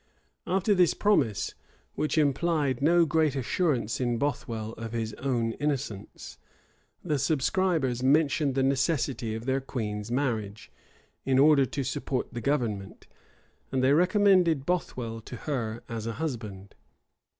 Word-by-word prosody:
After 190 +3 +2
this 180 -4 +3
promise, 140 - +1 0.4
which 155 +1 -1
implied 145 -2 +1
no 170 +3 +5
great 155 -2 +1
assurance 130 - 0
in 120 -2 0
Bothwell 115 -5 -3
of 115 0 -7
his 115 -2 -2
own 120 -4 0
innocence, 130 -9 -4 0.6
the 150 -5 0
subscribers 155 -3 +1
mentioned 140 0 +2
the 135 - +2
necessity 135 -4 0
of 115 +1 -6
their 135 +1 0
queen's 105 -5 -4
marriage, 110 - -2 0.5
in 130 -1 +2
order 140 -1 +5
to 140 +4 -3
support 130 0 -3
the 120 - -4
government; 110 -8 -2 0.7
and 130 -1 0
they 135 +2 +5
recommended 180 -3 +4
Bothwell 125 -10 -2
to 125 - -9
her 120 -5 -4
as 115 -1 -5
a 115 - -2
husband. 105 -9 -5
135 Hz, 130 wpm, -28 LUFS, 115-155 Hz, 0.7 s, no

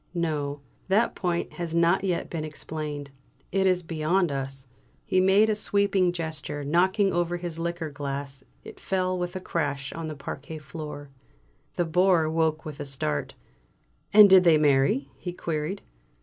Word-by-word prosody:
"No, 145 -4 -2 0.3
that 210 +5 +2
point 175 -2 -2
has 170 -2 -4
not 170 +3 +3
yet 180 -3 -1
been 165 -3 -4
explained. 150 -2 -6 0.4
It 190 0 +2
is 180 -1 +2
beyond 165 +2 0
us!" 135 -1 -4 0.4
He 185 - +2
made 195 +3 +5
a 215 - +2
sweeping 200 -3 +1
gesture, 160 -4 -5
knocking 190 +7 +2
over 175 0 0
his 170 -2 -6
liqueur 170 -2 -3
glass; 140 -1 -5 0.2
it - - -11
fell 185 -1 -1
with 175 0 -3
a - - -2
crash 145 -6 -3
on 165 -1 -5
the 155 - -5
parquet 140 +2 -7
floor. 150 -1 -8 0.6
The 175 - +1
Bore 175 0 +3
woke 160 -1 0
with 155 -2 -7
a - - -3
start. 105 - -2 0.8
"And 210 0 +9
did 190 -1 +7
they 165 -3 +6
marry?" 150 - +3
he 180 - -6
queried. 165 +3 -3
165 Hz, 160 wpm, -26 LUFS, 145-185 Hz, 0.8 s, And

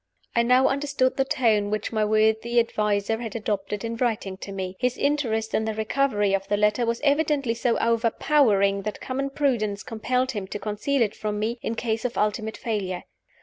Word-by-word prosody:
I 235 - +5
now 250 +2 +4
understood 275 -2 0
the 270 - +1
tone 220 -6 +2
which 210 0 -2
my 215 -1 +2
worthy 220 +2 +2
adviser 210 -1 0
had 230 -2 -6
adopted 205 -2 -2
in 230 0 -3
writing 220 -5 -1
to 195 - -8
me. 190 -1 -4
His 250 0 0
interest 235 -7 0
in 220 - +1
the 220 -1 -2
recovery 220 -2 +1
of 195 0 -1
the 205 - +1
letter 210 +3 +2
was 230 0 -1
evidently 285 -4 +2
so 235 0 0
overpowering 230 -3 +2
that 210 +1 -5
common 275 +1 -3
prudence 235 -8 0
compelled 250 +3 -1
him 205 -5 -5
to 205 - -4
conceal 220 +6 0
it 210 -1 -2
from 210 -1 -3
me, 225 +3 -2
in 230 - -3
case 225 -1 -2
of 250 -1 -3
ultimate 215 +1 -1
failure. 195 -6 -3
225 Hz, 190 wpm, -25 LUFS, 210-250 Hz, -, I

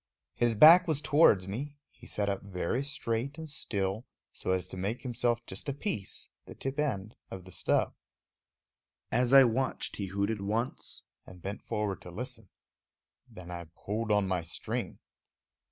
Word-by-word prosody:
His 120 -1 +1
back 170 - +9
was 155 -4 +2
towards 145 - +4
me; 140 +9 -5 0.2
he - - -16
sat 105 -1 -1
up 100 -1 -1
very 100 +5 -2
straight 140 -1 -2
and 160 -1 -6
still, 110 -5 -3 0.3
so - - -5
as 95 -1 +1
to - - -7
make 100 +6 -3
himself 120 -1 0
just 95 +9 -4
a - - 0
piece, 135 - -3 0.2
the - - -10
tip 135 +2 -4
end, 110 -8 -1 0.2
of 95 -1 -8
the 95 - -11
stub. - - +1 1.2
As 125 0 +2
I 135 0 +10
watched, 130 +2 -1
he 100 - -3
hooted 100 +2 -1
once 110 +5 -3 0.2
and 90 - -12
bent 100 +4 -5
forward 105 -4 -2
to - - -10
listen. - - -7 0.8
Then 90 -1 -10
I 85 -1 -6
pulled 110 +2 -3
on 105 -2 +3
my 90 -2 0
string. 85 +1 -4
110 Hz, 165 wpm, -30 LUFS, 95-135 Hz, 1.2 s, I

